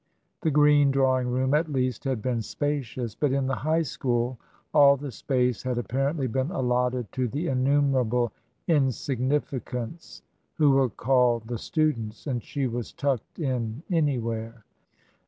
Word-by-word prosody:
The 160 - +1
green 145 -1 +5
drawing 130 -2 +2
room, 130 +2 0
at 155 +1 +1
least, 130 -3 -1
had 130 -5 -1
been 125 -3 0
spacious; 130 -3 -3
but 140 +5 0
in 135 0 +1
the 135 -2 -1
High 155 +8 +1
School 125 -3 -1 0.3
all 140 -2 +7
the 140 0 -6
space 125 0 0
had 130 -1 -2
apparently 135 +4 -1
been 130 +4 -1
allotted 125 - 0
to 130 -1 -1
the 145 +9 -3
innumerable 130 -3 +2 0.4
insignifi 135 -2 0
cants 125 +7 -7 0.3
who 150 -3 +4
were 135 -1 +3
called 125 -1 +2
the 120 -1 -4
students; 115 -9 -1
and 125 -5 -2
she 140 +2 -3
was 120 -1 -3
tucked 140 -5 -2
in 125 -3 -2
anywhere. 115 - -1
130 Hz, 145 wpm, -26 LUFS, 120-145 Hz, 0.4 s, all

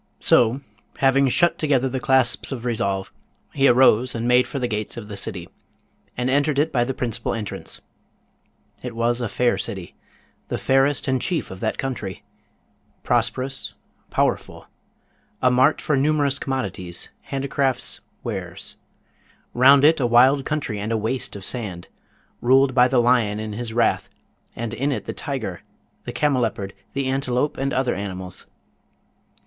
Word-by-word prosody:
So, 120 +4 +3 0.4
having 135 0 +3
shut 175 +7 +2
together 135 -4 +2
the 130 0 -3
clasps 130 -3 +2
of 125 -3 -5
resolve, 100 -5 -1 0.4
he 140 -1 +3
arose 125 -1 +4
and 115 +1 -2
made 125 0 +4
for - - -5
the 125 -2 -1
gates 110 0 -4
of 105 -3 -8
the 105 - -6
city, 95 -3 -4 0.7
and 125 0 -1
entered 145 +2 +2
it 155 +3 +2
by 120 -4 +2
the 130 +2 -3
principal 115 -2 -2
entrance. 105 -3 -6 1.0
It 125 -2 -6
was 120 +1 0
a 115 - -2
fair 125 +3 +1
city, 95 -6 -5 0.5
the - - -2
fairest 135 +1 +2
and 130 -1 +1
chief 175 -4 -1
of 95 - -8
that 110 +1 -2
country; 110 -9 -4 0.8
prosperous, 135 +1 -1 0.3
powerful; - - -1 0.7
a 125 - +3
mart 130 +5 +4
for 150 - 0
numerous 145 0 +1
commodities, 95 -10 -4 0.2
handicrafts, 135 -1 -1 0.2
wares; - - -5 0.8
round 135 +3 +6
it 160 +1 +5
a 125 - +2
wild 130 +4 +5
country 135 -9 -2
and 105 +2 -3
a 115 - +1
waste 110 +3 -2
of 100 -2 -6
sand, 100 -8 -4 0.5
ruled 130 +2 +4
by 125 -1 +5
the 130 -1 +2
lion 120 -4 +2
in 110 -1 -5
his 115 +1 -5
wrath, 115 +1 +1 0.5
and 115 -1 -4
in 140 +4 -1
it 135 - -3
the - - -4
tiger, 120 - -4 0.4
the - - -4
camelopard, 115 -9 0 0.2
the 140 -1 -1
antelope, 130 +1 0
and 135 0 -1
other 130 -1 +1
animals. 95 -2 -6
125 Hz, 155 wpm, -22 LUFS, 110-135 Hz, 1.0 s, round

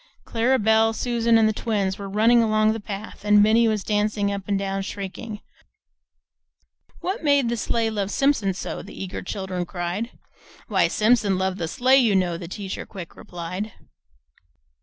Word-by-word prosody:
Clara 240 +3 +2
Belle, 220 0 +3
Susan, 235 0 +2
and 220 -1 +4
the 215 - +1
twins 205 -3 -1
were 200 -1 -6
running 225 +4 +4
along 215 -1 +3
the 225 - -4
path, 205 0 -8
and 210 0 +5
Minnie 225 +2 +4
was 215 -3 0
dancing 210 -1 0
up 200 -1 -5
and 200 -1 +1
down, 195 0 -2
shrieking: 205 +2 -6 1.6
"'What 380 +3 -3
made 285 -5 +3
the 235 - 0
sleigh 225 0 0
love 200 -2 -2
Simpson 225 -8 +1
so?' - - -5
The - - -11
eager 190 -1 -5
children 185 -2 -4
cried; 175 +6 -3 0.6
'Why - - +3
Simpson 215 -3 +2
loved 190 0 -1
the 165 - -2
sleigh, 255 +9 +3
you 225 -6 +3
know,' 180 -2 +1
The 170 -1 -8
teacher 190 +2 -5
quick 185 -5 -10
replied." 180 +4 -6
210 Hz, 165 wpm, -24 LUFS, 195-225 Hz, 1.6 s, and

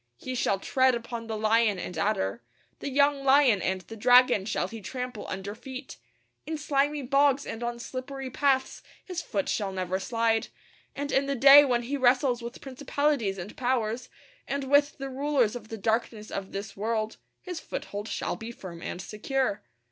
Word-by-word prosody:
He 255 - -6
shall 220 -5 +1
tread 260 +5 +2
upon 235 -1 -6
the 220 -1 -3
lion 220 -1 +3
and 180 0 -6
adder; 120 - 0 0.4
the - - -4
young 280 0 +3
lion 265 -7 +5
and 190 0 -1
the 225 +5 -10
dragon 245 -2 +5
shall 205 -4 -1
he 225 +2 -9
trample 250 +1 -5
under 195 +2 -5
feet. 260 +4 -9 0.5
In 315 0 -2
slimy 290 -1 0
bogs 275 +1 +3
and 225 - -6
on 240 0 -2
slippery 260 +2 -6
paths 265 -1 +1 0.2
his 360 -2 -4
foot 200 -10 -2
shall 200 -3 -1
never 185 0 -2
slide; 230 +1 +1 0.5
and 285 0 -3
in 275 +1 +2
the 280 - 0
day 275 +3 +9
when 245 -3 +1
he 280 +4 -2
wrestles 250 -1 +3
with 235 +1 -8
principalities 270 -5 -1
and 185 +3 -7
powers, 245 -2 -1 0.4
and 280 0 -2
with 285 +2 +3
the 275 -1 -5
rulers 265 -4 +1
of 225 -3 -8
the 225 0 -6
darkness 220 0 -1
of 195 -1 -5
this 200 +1 -6
world, 220 +1 -2 0.2
his 360 -4 -6
foothold 205 -7 -6
shall - - -2
be 225 +1 -7
firm 175 -7 -9
and 180 - -5
secure. 255 +2 -1
240 Hz, 180 wpm, -28 LUFS, 215-275 Hz, 0.5 s, day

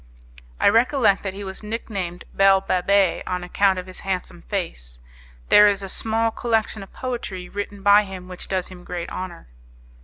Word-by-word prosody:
I - - +4
recollect 230 -1 +4
that 195 -1 -4
he 200 - -6
was 190 -1 -6
nicknamed 200 -5 -5
'Belle 195 -1 +5
Babet,' 190 0 +2
on 180 -1 -2
account 190 +1 +2
of 180 - -4
his 185 0 -8
handsome 190 -2 -4
face. - - -4 0.5
There 210 0 +8
is 200 -1 +1
a 195 - -5
small 225 +3 0
collection 225 -2 -1
of 195 - -11
poetry 220 -8 -5
written 205 0 -6
by 205 +1 +6
him 185 -2 -8
which 180 -1 -8
does 185 -2 -1
him 180 -1 -12
great 175 -1 -5
honour." 185 -2 -6
195 Hz, 175 wpm, -23 LUFS, 180-210 Hz, 0.5 s, There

